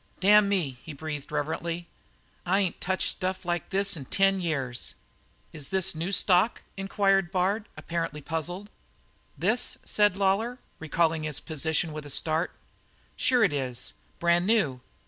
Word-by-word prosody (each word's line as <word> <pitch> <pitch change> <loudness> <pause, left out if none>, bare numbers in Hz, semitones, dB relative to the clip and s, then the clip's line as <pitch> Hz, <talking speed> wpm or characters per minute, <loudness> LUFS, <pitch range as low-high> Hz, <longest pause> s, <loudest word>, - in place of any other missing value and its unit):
"Damn 205 +1 +6
me!" 155 -11 0
he 160 - -8
breathed 150 -1 -6
reverently. 165 +3 -2 0.6
"I 190 +3 +2
ain't 185 -4 -2
touched 190 +1 0
stuff 185 -1 -3
like 175 -1 -1
this 195 0 +1
in 140 -4 -7
ten 195 +5 +3
years." 135 -8 -2 0.6
"Is 150 -3 -8
this 190 -1 +1
a - - -10
new 175 +4 -1
stock?" 190 +3 +3
inquired 195 -1 +2
Bard, 195 +4 0
apparently 165 -3 -3
puzzled. 175 +7 -4 0.7
"This?" - - +1
said 205 -2 +3
Lawlor, 200 +5 +1 0.2
recalling 160 0 +1
his 155 -2 -2
position 160 +1 -1
with 150 -1 -6
a - - -9
start. 155 +4 0 0.7
"Sure 250 -2 +3
it 195 - +3
is; 130 -3 -3 0.2
brand 170 +1 +3
new. 165 - +2
175 Hz, 145 wpm, -28 LUFS, 155-195 Hz, 0.7 s, Damn